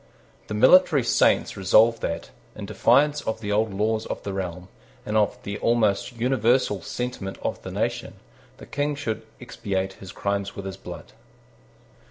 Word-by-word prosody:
The 105 - -4
military 145 +4 +6
saints 120 - +2
resolved 110 +4 +4
that, 85 0 -4 0.2
in - - -6
defiance 150 +1 +3
of 110 0 -3
the 105 -2 -4
old 110 +1 +1
laws 110 +3 -1
of - - -5
the 100 - -4
realm, 90 -1 -5 0.4
and 105 - -3
of 105 -1 +2
the 100 0 -5
almost 115 0 +1
universal 120 -4 +2
sentiment 115 -3 -5
of - - -3
the - - -7
nation, - - -3 0.4
the - - -11
King 145 +1 -2
should 110 -6 -3 0.2
expiate 95 -1 -3
his 95 -2 -9
crimes 100 0 -2
with 100 - -7
his 95 -2 -5
blood. - - -10
105 Hz, 160 wpm, -25 LUFS, 95-120 Hz, 0.4 s, military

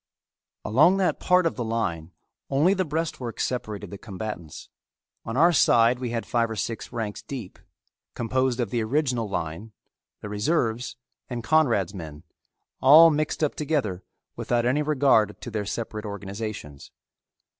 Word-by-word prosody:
Along 150 - +5
that 190 -2 +1
part 180 0 +3
of 165 - +1
the 120 - -2
line 95 -9 -2 0.4
only 150 +8 +3
the 190 -1 0
breastwork 155 -7 -4
separated 105 -6 -3
the 100 - -8
combatants. 100 -6 -7 0.6
On 115 +3 -4
our 170 +4 +5
side 120 -3 +4
we 125 -2 -3
had 115 -1 -3
five 115 -1 0
or 110 - -4
six 115 +1 -4
ranks 110 -3 -4
deep, 115 -11 -8 0.6
composed 130 +1 0
of 115 -5 -1
the 120 - 0
original 125 -2 0
line, 100 +5 -4 0.5
the - - -6
reserves, 115 +2 -1 0.3
and 120 -2 -4
Conrad's 115 - +2
men, 80 -5 -8 0.6
all 160 +5 +8
mixed 155 +1 -1
up 150 - +1
together 135 - -2 0.3
without 120 -1 0
any 130 +5 +2
regard 135 -8 +2
to 120 - -8
their 105 -2 -3
separate 110 -1 -4
organizations. 100 -7 -7
115 Hz, 145 wpm, -25 LUFS, 105-140 Hz, 0.6 s, all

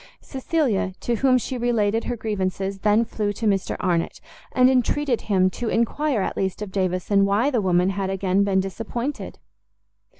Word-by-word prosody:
Cecilia, 265 - -1
to 240 -1 -1
whom 255 +1 +4
she 255 +1 -4
related 225 -2 +1
her 245 - -2
grievances, 195 -2 -2
then 210 +3 +3
flew 210 -2 -2
to 225 - -5
Mr 200 -2 +1
Arnott, 170 -2 -1 0.3
and 255 0 +4
entreated 260 0 +1
him 185 -3 +2
to 235 +4 -4
enquire 235 0 0
at - - -3
least 190 +2 -2
of 200 - -7
Davison 190 +1 +1
why 205 +8 +2
the 240 -5 +1
woman 180 0 +2
had 195 0 -2
again 195 0 +1
been 195 -1 +2
disappointed. 230 +8 -5
210 Hz, 165 wpm, -23 LUFS, 190-240 Hz, 0.3 s, whom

